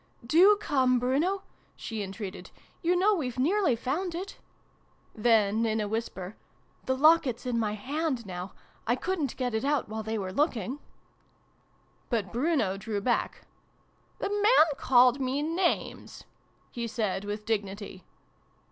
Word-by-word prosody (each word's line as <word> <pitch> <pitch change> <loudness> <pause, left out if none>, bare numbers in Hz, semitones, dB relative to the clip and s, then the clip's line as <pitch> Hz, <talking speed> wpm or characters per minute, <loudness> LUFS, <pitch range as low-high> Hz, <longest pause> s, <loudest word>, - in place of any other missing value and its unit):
" - - -19
Do 410 +3 +7
come, 260 -10 +2
Bruno! 295 +11 0 0.2
" - - -35
she 220 -2 -5
entreated. 195 0 -7 0.2
" - - -34
You 350 +1 +2
know 385 +4 +4
r 410 - +2
we've 255 -6 -3
nearly 320 - +2
found 330 +10 -2
it! 375 +3 -6 0.4
" - - -38 0.3
Then, 220 -1 +3
in 220 -1 0
a 210 - -1
whisper, 205 -3 -4 0.3
" - - -35
The 260 0 +1
locket's 290 -5 +4
in 240 -2 0
my 210 -2 0
hand, 265 +3 -2
now. 180 0 -6 0.3
I 240 - +3
couldn't 315 -2 -2
get 250 -3 -2
it 220 - -1
out 285 -5 0
while 220 0 -4
they 220 +1 -3
were 190 -2 -4
looking! 265 - -1 0.6
" - - -38
But 215 -7 -1
Bruno 245 - +1
drew 210 +1 -3
back. 240 +4 -1 0.4
" - - -38
The - - -1
man 415 -3 +5
called 255 -1 +4
me 265 +3 -1
names," 340 +3 -2 0.5
he 235 -1 -4
said 210 -4 -2
with 210 +1 -5
dignity. 200 -3 -3
245 Hz, 165 wpm, -28 LUFS, 215-305 Hz, 0.6 s, Do